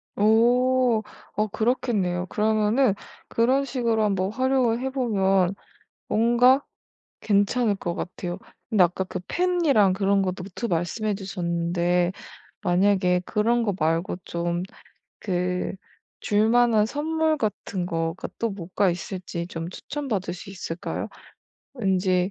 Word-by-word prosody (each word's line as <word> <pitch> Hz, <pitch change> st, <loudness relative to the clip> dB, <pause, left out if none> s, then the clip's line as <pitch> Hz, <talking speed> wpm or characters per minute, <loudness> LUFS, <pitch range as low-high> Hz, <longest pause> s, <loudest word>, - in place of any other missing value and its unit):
오. 240 Hz, +2 st, +3 dB, 0.3 s
어 215 Hz, +1 st, +1 dB
그렇겠네요. 210 Hz, -5 st, 0 dB
그러면은 215 Hz, +3 st, +2 dB, 0.3 s
그런 255 Hz, +4 st, +2 dB
식으로 235 Hz, -4 st, 0 dB
한번 195 Hz, -1 st, 0 dB
활용을 255 Hz, -1 st, +1 dB
해 265 Hz, -, -2 dB
보면 195 Hz, -7 st, +1 dB, 0.5 s
뭔가 240 Hz, +5 st, +4 dB, 0.6 s
괜찮을 205 Hz, +2 st, +2 dB
것 175 Hz, -3 st, -4 dB
같아요. 175 Hz, 0 st, -5 dB, 0.3 s
근데 215 Hz, -5 st, +5 dB
아까 180 Hz, +2 st, 0 dB
그 185 Hz, 0 st, -6 dB
펜이랑 325 Hz, -, +3 dB
그런 195 Hz, 0 st, +2 dB
거 185 Hz, -1 st, 0 dB
노트 190 Hz, +5 st, -6 dB
말씀해 200 Hz, +5 st, -1 dB
주셨는데 175 Hz, -2 st, 0 dB, 0.5 s
만약에 185 Hz, -1 st, +2 dB
그런 230 Hz, +2 st, +1 dB
거 205 Hz, -3 st, 0 dB
말고 165 Hz, +2 st, 0 dB
좀 170 Hz, +1 st, -2 dB, 0.6 s
그 180 Hz, -1 st, -1 dB, 0.5 s
줄만한 220 Hz, +1 st, +3 dB
선물 315 Hz, +4 st, 0 dB
같은 200 Hz, -5 st, -3 dB
거가 165 Hz, -1 st, -3 dB
또 230 Hz, -, 0 dB
뭐가 190 Hz, +1 st, 0 dB
있을지 175 Hz, -1 st, -4 dB
좀 165 Hz, -1 st, -5 dB
추천받을 215 Hz, -6 st, -4 dB
수 185 Hz, +3 st, -10 dB
있을까요? 175 Hz, -3 st, -5 dB, 0.7 s
왠지 185 Hz, -4 st, +1 dB
205 Hz, 240 characters per minute, -25 LUFS, 180-235 Hz, 0.7 s, 근데